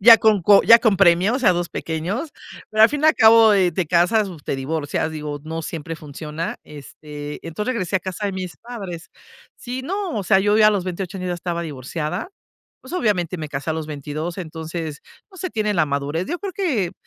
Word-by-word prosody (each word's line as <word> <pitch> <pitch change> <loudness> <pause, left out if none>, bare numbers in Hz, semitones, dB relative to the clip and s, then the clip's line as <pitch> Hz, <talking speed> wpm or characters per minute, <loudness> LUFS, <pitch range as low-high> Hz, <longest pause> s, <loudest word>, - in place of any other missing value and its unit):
Ya 225 +2 +9
con 215 -2 +3
co 200 +3 +6
ya 230 - +8
con 220 -4 +2
premios 185 +3 +4
o - - -2
sea 215 -8 +5
2 175 0 -2
pequeños, 180 - -4 0.4
pero 215 0 +6
al - - +6
fin 295 +2 -3
y 310 - +5
al 315 - +6
cabo, 225 -1 +7
eh, 185 -3 +3
te 175 0 -1
casas, 185 +6 +3 0.2
te - - -2
divorcias, 150 +3 -2
digo, 150 -2 -5
no 160 +1 -5
siempre 165 +1 -6
funciona, 155 - -6
este, 150 0 -9
entonces 210 +9 -3
regresé 190 -3 -1
a - - -2
casa 190 +3 -4
de 200 - -2
mis 185 -6 -6
padres. 195 - -8 0.5
Sí, 255 +1 -6
no, 385 +5 -3
o 205 - -1
sea, 190 +1 +4
yo 205 +2 +2
ya 215 -1 +7
a - - +4
los 200 -4 -1
28 185 +1 -5
años 185 - -4
ya 175 - -1
estaba 175 -1 -3
divorciada, 150 - -4 0.5
pues - - -13
obviamente 185 - 0
me 155 -1 -5
casé 145 +2 -4
a - - +1
los 160 -1 -4
22, 155 +4 -5
entonces 160 -2 -6 0.3
no 380 - -16
se 370 +1 -4
tiene 215 -4 0
la 160 -3 +2
madurez. 145 +5 -2
Yo 350 +3 -3
creo 395 0 -5
que 265 - -1
180 Hz, 220 wpm, -21 LUFS, 160-215 Hz, 0.5 s, Ya